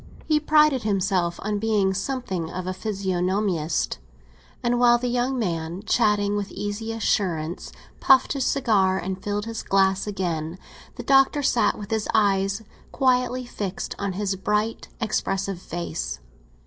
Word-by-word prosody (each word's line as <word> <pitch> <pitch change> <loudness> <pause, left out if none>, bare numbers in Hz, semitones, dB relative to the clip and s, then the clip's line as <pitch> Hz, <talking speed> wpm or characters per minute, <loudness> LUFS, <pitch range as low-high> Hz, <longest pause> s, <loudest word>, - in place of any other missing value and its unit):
He 305 -1 +3
prided 300 -3 +4
himself 190 -4 0
on 210 0 -1
being 205 -3 +2
something 190 -6 -3
of 185 +1 -5
a 185 - -2
physiognomist, 185 -4 -1 0.6
and 240 0 +1
while 240 -1 +6
the 250 +1 -3
young 250 +2 0
man, 170 -3 -3
chatting 205 -3 +2
with 205 -1 -2
easy 205 +2 -4
assurance, 180 -7 -1 0.3
puffed 265 -2 +5
his 275 -2 -1
cigar 205 -8 +2
and 190 0 -4
filled 205 0 -2
his 225 -1 -4
glass 195 0 +2
again, 175 -4 -3 0.4
the - - -7
Doctor 270 +1 +4
sat 245 -3 +2
with 205 0 -8
his 220 -1 -1
eyes 200 0 +2 0.3
quietly 250 -1 +1
fixed 200 -5 -4
on 200 -2 -2
his 200 0 -1
bright, 210 +3 -1
expressive 195 -4 -1
face. - - -4
205 Hz, 140 wpm, -24 LUFS, 185-230 Hz, 0.6 s, while